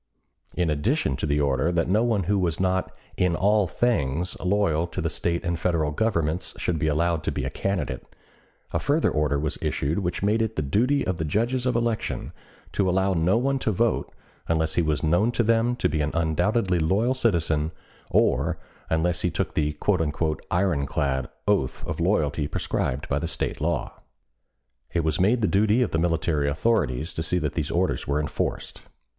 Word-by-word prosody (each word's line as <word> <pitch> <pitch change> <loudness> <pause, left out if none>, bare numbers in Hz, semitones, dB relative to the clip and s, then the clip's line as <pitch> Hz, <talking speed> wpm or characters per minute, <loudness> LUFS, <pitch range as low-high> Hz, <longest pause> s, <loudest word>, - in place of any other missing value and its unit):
In 90 -3 +1
addition 75 -2 0
to - - -2
the 75 0 +1
order 70 +3 +1
that 85 -1 +1
no 105 +5 +3
one 110 -5 +1
who 100 +3 +1
was 85 -3 0
not 95 0 0 0.3
in 90 -2 +2
all 105 +1 +3
things 85 - 0
loyal 90 -4 +1
to - - -6
the - - -1
State 85 0 -1
and 85 -1 -1
Federal 80 -4 +1
Governments 85 -2 -1
should 85 -3 -1
be 80 - 0
allowed 80 +1 +1
to - - -1
be - - -3
a - - -3
candidate, 95 -8 -3 0.7
a - - +1
further 150 +3 +2
order 75 -2 +1
was 75 +1 -2
issued 75 +7 -1
which 90 0 -2
made 105 +3 +2
it 110 0 -1
the 75 - -1
duty 125 - +1
of 95 -2 -1
the 80 - -2
judges 120 - 0
of 125 - +1
election 115 -2 -1 0.4
to 95 -2 +1
allow 95 +1 +2
no 90 +5 +2
one 135 +2 +1
to 110 - 0
vote 115 +3 0 0.4
unless 80 -1 +1
he - - +2
was 80 -2 0
known 90 +9 +3
to 120 - +2
them 115 +2 +2
to - - +1
be 80 - -1
an 75 - 0
undoubtedly 90 +4 +1
loyal 100 +10 +2
citizen 80 - +1 0.4
or - - +2 0.3
unless 80 +1 +1
he - - +1
took - - -2
the 75 0 -1 0.7
"iron 85 -6 +1
clad" 65 -2 -1 0.2
oath 95 -11 0
of - - -4
loyalty 80 -5 +1
prescribed 65 -1 -2
by - - 0
the - - -3
State - - -3
law. - - -1 1.0
It 85 -1 +1
was 80 -1 0
made 110 +5 +3
the - - +4
duty 110 +5 +3
of - - -3
the 80 - +1
military 80 -3 +1
authorities 75 - 0
to - - -3
see 85 +3 0
that 75 -5 -1
these 75 -3 -2
orders 90 +2 0
were 70 +1 +1
enforced. 75 - -3
85 Hz, 190 wpm, -25 LUFS, 75-105 Hz, 1.0 s, the